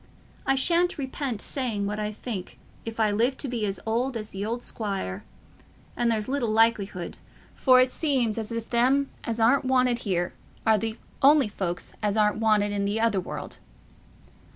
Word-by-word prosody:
I 270 - +4
shan't 345 +6 +2
repent 265 -5 -3
saying 230 -7 -2
what 210 +1 -3
I 210 0 -2
think, 210 -3 -6 0.3
if 225 0 -6
I 215 -2 +3
live 240 +6 +1
to 285 - -3
be 235 -4 -1
as 195 - -3
old 235 +3 0
as 215 -1 -6
th' 195 +1 -4
old 235 +3 -3
squire; 195 - -4 0.7
and 240 -1 +1
there's 215 -2 0
little 260 -4 0
likelihood—for 220 +3 +1
it 255 0 +4
seems 255 -9 0
as 220 +1 -5
if 230 -1 -5
them 260 +4 +3
as 230 0 -2
aren't 245 +5 +4
wanted 255 -2 +2
here 180 -5 -1 0.3
are 220 -1 +4
th' 225 +1 -3 0.2
only 285 -2 +6
folks 180 -4 -4
as 210 0 0
aren't 210 -1 +3
wanted 215 -2 +2
i' 200 -1 0
th' 205 +2 0
other 225 -4 +2
world." - - -7
225 Hz, 175 wpm, -26 LUFS, 210-255 Hz, 0.7 s, only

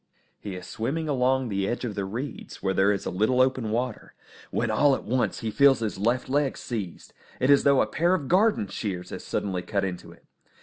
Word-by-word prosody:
He 100 -3 -6
is 90 0 -8
swimming 140 - -3
along 130 -2 +1
the 100 -1 -1
edge 120 +3 -2
of 110 - -3
the 100 -1 -3
reeds 120 +7 -6
where 95 -1 +1
there 95 +2 +3
is 100 - -2
a - - -2
little 110 +7 +1
open 130 -3 +2
water, 120 +1 -3 0.3
when 115 -1 -1
all 140 +5 +4
at - - -7
once 125 +3 -1
he 110 -1 -2
feels 140 +2 +5
his 110 -3 -3
left 120 +5 0
leg 140 0 0
seized. 105 -8 -6 0.3
It 130 +3 +3
is 140 - +7
as - - -5
though 140 -1 +5
a - - +3
pair 175 +3 +1
of 145 -7 -4
garden 195 - +3
shears 95 -2 -5
had - - -6
suddenly 95 -3 -2
cut 100 +1 -1
into 90 -2 -6
it! - - -19
120 Hz, 225 wpm, -26 LUFS, 100-135 Hz, 0.3 s, is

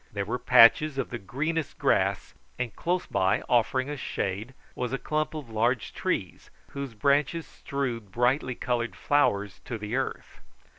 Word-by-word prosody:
There 100 -1 -3
were 120 +4 -2
patches 130 +4 +6
of 135 - -2
the 120 - -4
greenest 150 +10 -3
grass, - - +1 0.2
and 120 -3 -3
close 180 +1 -1
by, 95 +1 +1
offering 125 +2 +2
us 145 -1 -5
shade, 105 +6 -3 0.2
was 125 -1 -3
a - - +1
clump 155 +3 -2
of 150 -5 -6
large 115 +1 0
trees - - -3 0.2
whose 140 -4 -6
branches 145 +7 +2
strewed 120 -7 -4
brightly 125 +3 +1
coloured 120 -1 -2
flowers 105 -9 +1
to 120 - -4
the 105 +2 -4
earth. 135 - -4
125 Hz, 155 wpm, -27 LUFS, 115-140 Hz, 0.2 s, patches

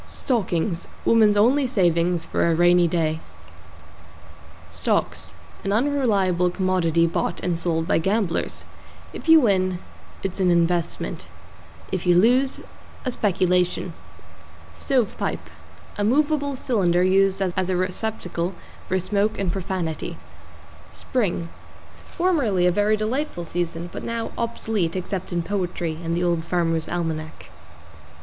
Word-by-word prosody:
=STOCKINGS= 185 - -1 0.2
Woman's 215 -2 +5
only 255 +6 +4
savings 175 -5 +1
for - - +1
A 165 - +2
Rainy 175 +1 +5
Day. 160 -2 0 1.5
=STOCKS= 80 - -1 0.3
An 195 - -1
unreliable 205 -8 +2
commodity 175 -3 +1
bought 170 - -1
and 175 -2 -1
sold 165 -1 -1
by - - +3
gamblers. 190 0 -1 0.5
If - - -7
you 325 0 +9
win, 185 -7 +2 0.5
it's 195 0 -3
an 185 -1 +3
investment; 170 0 0 0.6
if 185 -1 -2
you 175 -1 +5
lose, 255 +7 +3 0.4
a 255 - 0
speculation. 180 -5 +1 0.8
=STOVE 255 -7 0
PIPE= - - -3 0.5
A - - +1
movable 285 +4 +1
cylinder 180 -9 +1
used 195 +1 +3
as 185 -1 -1
a 185 - +1
receptacle 185 -2 -2 0.3
for 185 - +1
smoke 205 +3 0
and 190 -3 -1
profanity. 180 -4 -3 0.7
=SPRING= 185 -9 -2 0.6
Formerly 280 - +1
a 180 - +5
very 205 +3 +2
delightful 215 - -2
season 170 0 -3
but - - -5
now 230 -1 -3
obsolete 220 -7 -2
except 185 0 -4
in 175 -1 -1
poetry 175 -4 -2
and 165 +1 -1
the 175 - 0
Old 170 -2 +1
Farmer's 165 -2 0
Almanac. 160 -2 -4
185 Hz, 125 wpm, -23 LUFS, 170-215 Hz, 1.5 s, you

